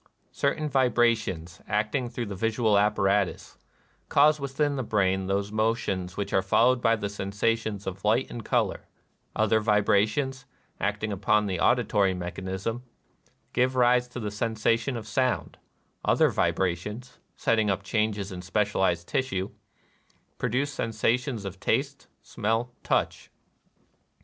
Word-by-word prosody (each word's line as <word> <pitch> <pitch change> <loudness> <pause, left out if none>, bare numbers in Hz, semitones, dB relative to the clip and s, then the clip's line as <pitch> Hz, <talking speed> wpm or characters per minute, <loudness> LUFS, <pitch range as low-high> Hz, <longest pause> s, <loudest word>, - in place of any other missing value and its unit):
Certain 150 +2 0
vibrations, 115 - +1
acting 110 +4 0
through 120 0 -4
the 100 - -5
visual 110 +1 +1
apparatus, 100 -1 +1 0.5
cause 150 +2 +5
within 140 +1 -1
the 130 - -1
brain 95 -4 +1
those 100 +1 -1
mo 110 +1 +2
tions 95 -4 -4
which 100 - -3
are 95 - +4
followed 120 +6 +3
by 115 -1 +4
the 105 -2 -3
sensations 105 +1 -2
of 95 +1 -6
light 115 +5 +2
and 120 - -6
color; - - -1 0.2
— - - -43
other 110 0 +3
vibrations, 110 +5 +1 0.3
acting 105 +1 -1
upon 105 +2 +2
the 95 -3 -2
auditory 105 -4 +2
mechanism, 95 +5 -4 0.7
give 130 +1 +2
rise 125 0 +4
to 125 0 -7
the 105 -3 -3
sensation 115 +3 0
of 110 - -7
sound; 120 - -1 0.2
— - - -44 0.2
other - - +4
vibrations, 95 +7 -2 0.2
setting 110 -2 +1
up 95 0 -1
changes 105 -1 -1
in 90 -1 -6
specialized 95 -3 0
tissue, 100 -8 -1 0.9
produce 130 +4 -1
sen 115 - -2
sations 115 +1 0
of 95 0 -6
taste, - - -1 0.2
smell, 115 +3 -2
touch. - - -1
110 Hz, 135 wpm, -27 LUFS, 100-120 Hz, 0.9 s, cause